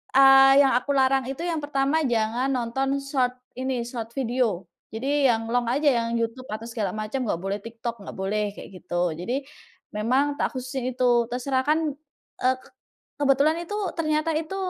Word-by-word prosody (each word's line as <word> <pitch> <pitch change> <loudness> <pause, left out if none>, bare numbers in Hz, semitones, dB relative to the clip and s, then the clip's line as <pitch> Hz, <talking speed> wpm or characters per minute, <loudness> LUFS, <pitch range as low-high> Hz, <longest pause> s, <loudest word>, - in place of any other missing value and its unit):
eee, 270 +1 +8
yang 265 - +3
aku 285 +3 -4
larang 265 -1 +3
itu, 275 +4 -5
yang 330 -3 -1
pertama 290 +2 +1
jangan 230 +2 0
nonton 265 +3 -1
short 260 -3 0 0.3
ini, 260 -2 -1
short 230 -2 -6
video. 235 -7 0 0.3
Jadi, 275 +4 +1
yang 225 -1 0
long 245 -1 +1
aja, 290 +4 +3 0.2
yang 230 - -2
YouTube 230 +3 -3
atau 215 +1 -5
segala 210 -5 -2
macam 215 +5 -3
nggak 170 - -1
boleh, 195 +1 -2
TikTok 230 -1 -6
nggak - - -7
boleh, 200 +2 -1
kayak - - -10
gitu. 175 0 0
Jadi, 240 - -3 0.5
memang 265 +7 +1
tak - - 0
khususin 255 0 -3
itu, 240 -2 +3
terserah 260 +1 0
kan, 310 +1 +3 0.6
eee, 255 +1 +4 0.6
kebetulan 285 +3 +3
itu 410 - -5 0.2
ternyata 310 0 +1
itu, 325 +4 -4
255 Hz, 165 wpm, -25 LUFS, 230-275 Hz, 0.6 s, eee